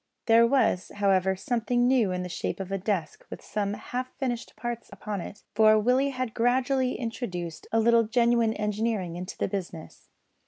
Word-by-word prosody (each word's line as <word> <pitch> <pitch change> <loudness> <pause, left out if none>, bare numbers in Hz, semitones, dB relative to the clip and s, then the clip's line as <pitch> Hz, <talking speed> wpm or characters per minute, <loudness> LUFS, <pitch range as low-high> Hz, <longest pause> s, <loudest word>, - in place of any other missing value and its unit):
There 230 0 +6
was, 235 -8 +1
however 190 -2 +2
something 245 +4 0
new 245 -7 +3
in 180 0 -2
the - - -4
shape 180 - -4
of 195 0 -5
a 195 - 0
desk 185 -5 -2
with - - -8
some 205 -1 -2
half 250 +4 -5
finished 245 -4 -3
plans 235 +1 -5
upon 205 -3 -5
it; 205 - -9
for 215 0 +6
Willie 250 +6 +2
had 255 -4 -3
gradually 255 +2 +1
introduced 180 -9 -5
a 225 - +3
little 230 0 +4
genuine 235 -1 +2
engineering 210 -4 -1
into 180 +2 -6
the - - 0
business. 185 -5 -7
220 Hz, 170 wpm, -27 LUFS, 195-245 Hz, -, There